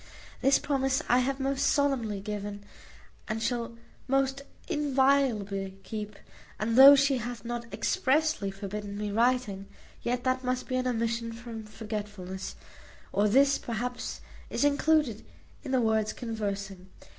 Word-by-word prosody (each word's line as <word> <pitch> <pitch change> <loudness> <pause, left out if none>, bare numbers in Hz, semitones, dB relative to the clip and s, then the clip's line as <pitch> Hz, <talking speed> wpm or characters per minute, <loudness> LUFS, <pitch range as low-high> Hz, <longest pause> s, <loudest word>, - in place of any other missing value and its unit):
This 270 +1 +5
promise 270 -2 0
I 245 - +4
have 265 +2 0
most 270 0 0
solemnly 245 -8 +1
given, 205 0 -5 0.6
and 215 +1 -2
shall 230 0 -2 0.3
most 270 +1 +1 0.3
inviolably 260 -9 +1
keep: 210 -1 -6 0.4
and 225 +2 0
though 275 +2 +11
she 275 -1 +3
hath 240 0 -6
not 235 -1 -5
expressly 300 -6 +1
forbidden 200 +1 -6
me 210 0 -3
writing, 225 -3 +1 0.3
yet 245 +1 -1
that 255 0 0
must 255 0 -1
be 255 - -1
an 255 0 0
omission 230 -1 -1
from 230 -1 -8
forgetfulness; 210 -3 -6 0.6
or 205 +2 +3
this, 275 +5 +4
perhaps, 245 +2 -4 0.3
is - - +1
included 290 -5 +2 0.4
in - - -6
the 260 -1 +2
word 220 -1 +1
conversing. 200 -5 -4
235 Hz, 135 wpm, -29 LUFS, 210-265 Hz, 0.6 s, though